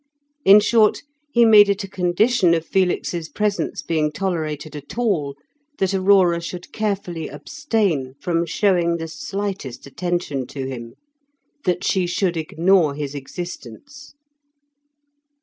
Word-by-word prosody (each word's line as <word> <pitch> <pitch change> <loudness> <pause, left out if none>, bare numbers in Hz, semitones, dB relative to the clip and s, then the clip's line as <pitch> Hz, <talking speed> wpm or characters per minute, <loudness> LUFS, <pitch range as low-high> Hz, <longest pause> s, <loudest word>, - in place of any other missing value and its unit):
In 200 -1 +8
short, 215 0 +3 0.3
he 235 -2 +5
made 210 -2 +7
it 200 +1 0
a - - -6
condition 185 +1 +2
of 165 0 -3
Felix's 175 -3 -1
presence 210 -1 -2
being 155 -2 0
tolerated 155 -4 -3
at 145 +8 -9
all, 170 -13 0 0.4
that 190 0 0
Aurora 185 -3 +4
should 175 +1 -8
carefully 195 -6 -3
abstain 205 - -2
from 170 0 -1
showing 170 -2 +1
the 165 0 -5
slightest 190 -4 -5
attention 150 -3 -3
to 135 0 -6
him; 120 -3 -7 0.7
that 180 -1 0
she 185 -2 +1
should 180 -1 0
ignore 165 -1 +2
his 145 -1 -4
existence. 175 - -9
175 Hz, 125 wpm, -21 LUFS, 155-200 Hz, 0.7 s, In